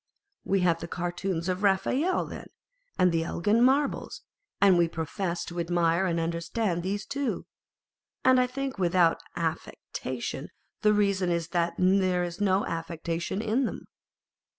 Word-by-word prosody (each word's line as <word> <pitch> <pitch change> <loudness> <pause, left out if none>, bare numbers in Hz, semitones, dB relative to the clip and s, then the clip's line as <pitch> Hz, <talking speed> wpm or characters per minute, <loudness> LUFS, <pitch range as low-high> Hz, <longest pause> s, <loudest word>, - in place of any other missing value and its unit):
We 195 -1 +1
have 170 -2 +2
the 170 - -6
Cartoons 175 0 -3
of 185 0 -1
Raphael 255 - +2
then, - - -8 0.5
and 180 -1 +4
the 165 -1 +1
Elgin 205 +7 +1
Marbles; 275 +3 +1 0.4
and 195 -2 +6
we 170 -1 +4
profess 170 +2 -3
to 175 0 -6
admire 170 +1 +2
and 170 -1 0
understand 170 +3 -1
these 200 +3 -3
too, 280 -1 -2 0.8
and 260 0 +6
I 250 - +3
think 270 -2 -4
without 175 -2 +3 0.2
any 170 - 0
aft'ectation. - - -6 0.3
The 210 -1 +4
reason 200 -3 +2
is 170 -1 -1
that 170 -1 0
there 185 -1 +3
is 175 +3 -5
no 195 -1 +2
affectation 165 +4 -3
in 230 +4 +1
them. - - -5
180 Hz, 150 wpm, -28 LUFS, 170-205 Hz, 0.8 s, and